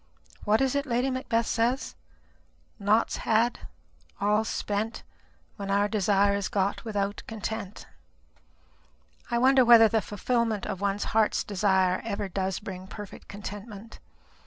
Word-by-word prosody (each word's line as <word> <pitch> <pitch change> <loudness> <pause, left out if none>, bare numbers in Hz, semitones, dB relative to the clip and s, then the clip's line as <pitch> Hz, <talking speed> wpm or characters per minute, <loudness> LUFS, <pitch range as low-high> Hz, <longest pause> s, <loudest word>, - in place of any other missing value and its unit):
What 215 +3 +3
is 265 -1 +2
it 285 +1 -1
Lady 245 +2 0
Macbeth 235 -3 0
says? 245 +5 0 0.9
'Naught's 210 +3 +2
had, 230 +2 0 0.5
all's 210 +2 +1
spent, 215 +2 -3 0.5
when 200 -1 -5
our 200 +1 +2
desire 200 -1 +2
is 200 -1 -1
got 200 0 -1
without 205 -2 -2
content.' 220 -2 -5 1.4
I 235 - 0
wonder 260 +2 +5
whether 230 -2 +8
the 220 0 +1
fulfilment 220 0 -1
of 195 -3 -4
one's 200 0 0
heart's 220 -1 +2
desire 190 -2 +1
ever 205 -2 -3
does 190 0 -2
bring 185 -2 -8
perfect 205 0 -10
contentment? 205 +2 -9
210 Hz, 130 wpm, -27 LUFS, 200-230 Hz, 1.4 s, whether